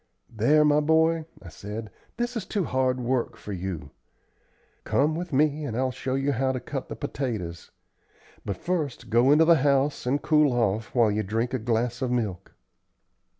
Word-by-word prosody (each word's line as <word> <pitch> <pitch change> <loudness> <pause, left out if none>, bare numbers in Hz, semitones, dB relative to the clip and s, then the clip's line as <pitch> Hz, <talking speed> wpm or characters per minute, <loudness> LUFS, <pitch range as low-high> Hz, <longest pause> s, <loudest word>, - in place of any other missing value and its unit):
"There, 150 +8 +4
my 150 0 +4
boy," 160 +1 +2 0.2
I 85 - -9
said, 105 +5 -7 0.3
"this 240 +1 -2
is 225 - -2
too 200 0 -2
hard 130 -3 0
work 125 0 -1
for 105 - -7
you. 90 -6 -5 0.9
Come 150 +3 +1
with 175 +2 -5
me 150 +2 +2
and 120 -6 -3
I'll 130 0 0
show 130 +1 -3
you 135 +1 0
how 130 +1 0
to 130 - -2
cut 135 +1 -6
the - - -5
potatoes. 115 - -4 0.7
But 100 -3 -4
first 160 -11 -3
go 120 +4 +4
into 155 +2 +6
the 170 0 +6
house, 140 -1 +1
and 140 +3 +2
cool 150 -4 +3
off 115 -1 -1
while 115 -3 +4
you 105 +1 0
drink 115 +5 -2
a 130 - 0
glass 120 +2 -1
of 130 - 0
milk." 110 -8 -3
130 Hz, 180 wpm, -26 LUFS, 115-150 Hz, 0.9 s, into